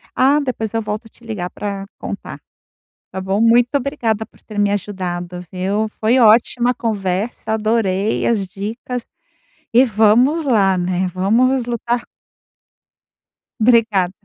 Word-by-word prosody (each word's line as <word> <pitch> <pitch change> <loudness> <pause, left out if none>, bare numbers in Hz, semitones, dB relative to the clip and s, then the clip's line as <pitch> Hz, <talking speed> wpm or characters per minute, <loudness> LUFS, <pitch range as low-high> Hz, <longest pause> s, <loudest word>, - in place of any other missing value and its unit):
Ah, 275 +3 +4
depois 245 -6 -3
eu 225 - 0
volto 210 +1 -4
a - - -14
te 235 - -24
ligar 210 -6 -4
pra 200 -1 -5
contar, - - -7 0.7
tá 190 - -5
bom? 190 +2 -1
Muito 235 +1 +5
obrigada 240 -6 -1
por - - -26
ter 210 -2 -7
me 205 0 +2
ajudado, 180 -3 -4
viu? 195 +4 -1
Foi 230 +4 +3
ótima 235 +2 +4
conversa, 215 -1 -2
adorei 215 -2 0
as 205 -5 0
dicas 225 +6 -5 0.7
e 250 +3 +6
vamos 240 +8 +3
lá, 200 -7 +3
né, 180 +1 0
vamos 235 +7 +2
lutar 240 0 -2 1.6
Obrigada. 220 -6 +3
220 Hz, 130 wpm, -19 LUFS, 195-240 Hz, 1.6 s, e